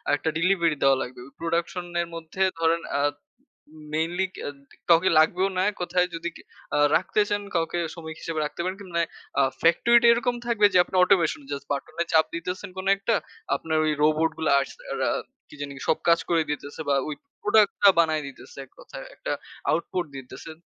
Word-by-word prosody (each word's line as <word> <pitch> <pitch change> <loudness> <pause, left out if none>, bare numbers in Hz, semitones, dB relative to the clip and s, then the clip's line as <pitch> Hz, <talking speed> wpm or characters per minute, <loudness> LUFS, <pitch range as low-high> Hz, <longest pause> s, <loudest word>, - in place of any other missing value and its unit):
একটা 160 - -2
ডেলিভারি 170 -2 +2
দেওয়া 135 -1 +5
লাগবে। 125 -1 -7 0.2
প্রোডাকশন 170 +2 -2 0.2
এর 170 - -4
মধ্যে 165 +3 -7 0.2
ধরেন 165 +1 +2 0.2
আ - - +2 0.7
উ - - -21
উম 155 - -13
মেইনলি 170 +4 0
কা - - -7 0.5
কাউকে 170 +2 +6
লাগবেও 180 +5 +3
না, 185 - +3 0.2
কোথায় 180 0 +1
যদি 165 +1 -3
কি - - -12 0.3
আ - - +2 0.2
রাখতে 190 +3 0
চান, 205 0 -1
কাউকে 165 0 0
শ্রমিক 160 -2 -8
হিসেবে 165 -1 -4
রাখতে 150 - -6
পারেন 185 +1 -2 0.2
মানে 170 0 +2 0.6
ফ্যাক্টরি 235 +9 +5
টা - - +5
এরকম 240 +1 +1
থাকবে 225 -3 +4
যে 185 - +5
আপনি - - -14
অটোমেশন 180 -5 +3
জাস্ট 140 0 -5
বাটনে 140 +4 -3
চাপ 160 0 +6
দিতেছেন 180 +4 -4
কোন 190 0 -6
একটা 200 +3 0 0.4
আপনার 160 -1 -2
ওই 155 - +2
রোবট 155 +1 +3
গুলো 160 - 0
আস - - -4 0.2
আ - - -2
রা - - +2 0.4
কি - - -14
জানি 140 -1 -5 0.2
সব - - +3
কাজ 170 0 +6
করে 165 -2 +3
দিতেছে 145 +1 -5
বা 140 - +3
ওই 155 - -3 0.3
প্রোডাক্ট 210 -1 +4
টা 200 - +9
বানায় 155 -2 +3
দিতেছে 300 - -14
এককথায় - - -11
একটা - - -4 0.4
আউটপুট 170 +2 -1
দিতেছে। 135 +4 -9
170 Hz, 185 wpm, -25 LUFS, 160-190 Hz, 0.7 s, টা